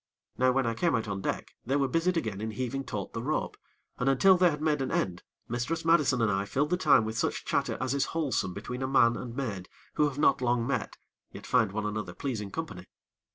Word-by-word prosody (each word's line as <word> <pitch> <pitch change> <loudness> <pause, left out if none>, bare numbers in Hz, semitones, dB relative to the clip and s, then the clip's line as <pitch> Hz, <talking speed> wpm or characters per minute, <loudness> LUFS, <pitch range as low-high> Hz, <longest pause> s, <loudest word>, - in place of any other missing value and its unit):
Now 130 0 +3
when 135 0 +1
I 115 - 0
came 170 +7 +1
out 110 -2 -1
on 100 -1 -3
deck, - - -3
they 135 +4 -1
were 140 -1 +2
busied 165 +6 +1
again 110 -9 -2
in 110 - -2
heaving 130 +4 -3
taut 105 -6 -5
the 115 - -3
rope, 150 +6 -2 0.4
and, 125 - +2
until 185 +8 +6
they 180 0 +5
had 150 -2 -3
made 150 -2 +1
an 130 - -1
end, 90 -2 -1 0.3
Mistress 120 +8 -2
Madison 150 -7 +4
and 110 - +2
I 100 0 0
filled 145 +9 -1
the - - +4
time 145 -10 +4
with 110 +1 -3
such - - -1
chatter - - 0
as 130 +2 -1
is 140 -1 +1
wholesome 130 - 0
between 125 +5 -5
a 130 - 0
man 120 -3 +4
and 120 -2 -6
maid 105 -9 -4 0.2
who 150 - +3
have 140 - -10
not 145 - +3
long 120 -1 +1
met, 125 -3 -2 0.3
yet - - -10
find 115 -6 +2
one 105 +1 -3
another 105 -4 -4
pleasing 110 -7 -3
company. 120 - -6
125 Hz, 235 wpm, -29 LUFS, 110-145 Hz, 0.4 s, until